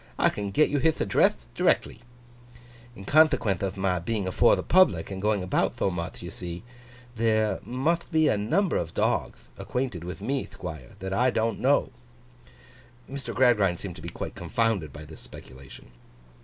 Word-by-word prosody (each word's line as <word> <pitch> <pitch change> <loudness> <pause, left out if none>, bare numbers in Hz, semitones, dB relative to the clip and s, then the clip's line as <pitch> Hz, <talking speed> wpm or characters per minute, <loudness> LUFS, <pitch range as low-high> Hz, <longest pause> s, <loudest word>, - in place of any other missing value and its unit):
I - - +4
can 100 -1 -4
get 155 +10 +3
you 145 - +1
hith 160 +3 +1
addreth - - +2
directly." 110 - +1 0.9
In 95 - -10
conthequenth 140 - +3
of 95 0 -3
my 95 -2 0
being 100 +3 -2
afore 95 - +4
the - - -4
public, 165 - +3
and 95 -1 -5
going 105 -2 +1
about 90 - 0
tho 95 - +1
muth, 85 -1 -5
you - - -6
thee, 85 +2 -7 0.5
there 110 -3 +1
mutht 155 +8 -1
be 160 -1 +3
a - - +3
number 160 - +1
of 85 -1 -4
dogth - - -1
acquainted 125 -9 -3
with 90 +1 -6
me, 135 0 -2
Thquire, 80 -8 -9
that 95 +1 -5
I 125 +6 +3
don't 115 -3 -1
know!' 135 0 +2 1.2
Mr. 135 -3 -6
Gradgrind 105 -9 +3
seemed 90 -2 -7
to - - -11
be 85 - -6
quite - - -6
confounded 110 -10 -1
by 75 +3 -10
this 80 +1 -11
speculation. 65 -1 -13
100 Hz, 170 wpm, -26 LUFS, 90-130 Hz, 1.2 s, I